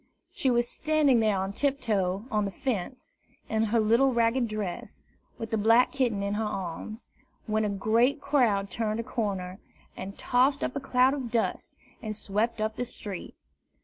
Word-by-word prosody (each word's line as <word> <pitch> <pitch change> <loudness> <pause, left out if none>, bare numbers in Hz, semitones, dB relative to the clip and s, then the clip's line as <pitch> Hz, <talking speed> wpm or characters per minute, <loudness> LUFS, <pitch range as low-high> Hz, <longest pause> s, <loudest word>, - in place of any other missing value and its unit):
She 265 - +1
was 240 -1 +2
standing 300 -3 +2
there 215 -3 +2
on 190 +1 -2
tiptoe 215 -8 0
on 210 -1 +1
the 200 - -3
fence, 240 +3 -4 0.3
in 220 0 +1
her 225 +2 +2
little 230 +5 +4
ragged 235 +1 +2
dress, 210 -4 -5 0.3
with 225 -1 -6
the 220 - +1
black 230 +4 +5
kitten 240 -7 0
in 200 0 -1
her 215 +2 -1
arms, 210 +2 -5 0.3
when 215 0 0
a 210 - 0
great 225 +8 +2
crowd 240 -9 +1
turned 220 -1 -1
a - - -1
corner, 195 -6 -3 0.4
and 195 +2 -7
tossed 260 +3 +2
up - - -2
a - - 0
cloud 260 -1 +3
of 265 -4 -4
dust, 230 -1 -2 0.2
and 215 -3 -4
swept 215 +2 -1
up 220 0 -2
the 245 - -1
street. 205 -5 -7
225 Hz, 175 wpm, -28 LUFS, 205-250 Hz, 0.4 s, black